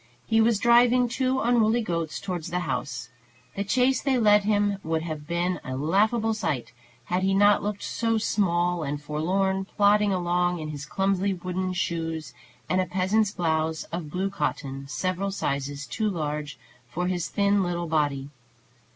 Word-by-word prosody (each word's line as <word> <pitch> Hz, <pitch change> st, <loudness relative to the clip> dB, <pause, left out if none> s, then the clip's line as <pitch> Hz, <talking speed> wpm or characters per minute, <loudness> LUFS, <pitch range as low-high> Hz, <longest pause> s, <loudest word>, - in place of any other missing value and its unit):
He 225 Hz, 0 st, +3 dB
was 225 Hz, -1 st, +3 dB
driving 240 Hz, +2 st, +5 dB
two 260 Hz, +2 st, 0 dB
unruly 235 Hz, -1 st, +3 dB
goats 165 Hz, -5 st, -2 dB
towards 180 Hz, -5 st, -4 dB
the 180 Hz, +1 st, -1 dB
house. 130 Hz, -8 st, -3 dB, 0.5 s
The 200 Hz, -, -1 dB
chase 255 Hz, +5 st, +2 dB
they 270 Hz, -2 st, +1 dB
led 210 Hz, -3 st, +4 dB
him 205 Hz, -1 st, +1 dB
would 160 Hz, 0 st, -1 dB
have 155 Hz, -3 st, -6 dB
been 175 Hz, +2 st, -1 dB
a 130 Hz, -, -5 dB
laughable 215 Hz, -, +2 dB
sight, 150 Hz, -, -2 dB, 0.3 s
had 180 Hz, +1 st, 0 dB
he 195 Hz, +1 st, +2 dB
not 205 Hz, +1 st, +5 dB
looked 205 Hz, 0 st, -3 dB
so 225 Hz, -1 st, 0 dB
small 175 Hz, -5 st, +1 dB
and 145 Hz, -1 st, -3 dB
forlorn 185 Hz, +6 st, 0 dB
plodding 205 Hz, +1 st, +3 dB
along 175 Hz, -1 st, +1 dB
in 155 Hz, -2 st, -5 dB
his 150 Hz, -1 st, -6 dB
clumsy 195 Hz, +2 st, 0 dB
wooden 185 Hz, +1 st, -3 dB
shoes, 165 Hz, -3 st, -3 dB, 0.3 s
and 185 Hz, -, +2 dB
a 185 Hz, -, -2 dB
peasant's 195 Hz, +3 st, +1 dB
blouse 160 Hz, -3 st, -1 dB
of 165 Hz, -2 st, -4 dB
blue 190 Hz, +5 st, -2 dB
cotton, 135 Hz, -7 st, -3 dB
several 185 Hz, +8 st, -2 dB
sizes 140 Hz, -5 st, -3 dB
too 215 Hz, +8 st, -1 dB
large 150 Hz, -4 st, -3 dB, 0.3 s
for 175 Hz, +8 st, -2 dB
his 180 Hz, -2 st, -1 dB
thin 200 Hz, 0 st, +2 dB
little 175 Hz, -1 st, -1 dB
body. 145 Hz, -3 st, -1 dB
185 Hz, 160 wpm, -26 LUFS, 160-205 Hz, 0.5 s, driving